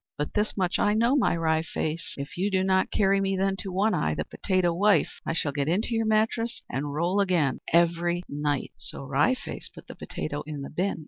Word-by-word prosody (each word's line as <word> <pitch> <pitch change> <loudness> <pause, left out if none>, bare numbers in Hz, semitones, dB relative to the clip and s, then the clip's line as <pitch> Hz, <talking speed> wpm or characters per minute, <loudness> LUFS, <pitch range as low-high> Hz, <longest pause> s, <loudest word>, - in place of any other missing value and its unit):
But 145 - -3
this 210 0 -1
much 180 -3 0
I 210 +1 +3
know, 235 +5 +3
my 255 -10 +2
Wry 160 -1 +2
Face, 160 0 -4
if 140 0 -6
you 190 +3 0
do 190 -1 +1
not 190 0 +2
carry 195 -1 +2
me 195 0 0
then 195 0 +1
to 195 -1 -6
One 205 +4 +2
Eye, 75 0 0
the - - -3
potato 185 -2 0
wife, 195 -2 +2
I - - 0
shall 155 -3 0
get 140 0 -1
into 205 +7 0
your 225 -1 +1
mattress 220 +2 +1
and 140 +3 -3
roll 170 +7 0
again 175 -9 +2
every 170 +1 +2
night!" 145 -1 -2
So - - -6
Wry 140 - +2
Face - - -8
put - - -14
the - - -9
potato 145 -1 -5
in 150 -2 -5
the - - -7
bin. 185 +5 -1
175 Hz, 220 wpm, -27 LUFS, 150-200 Hz, -, I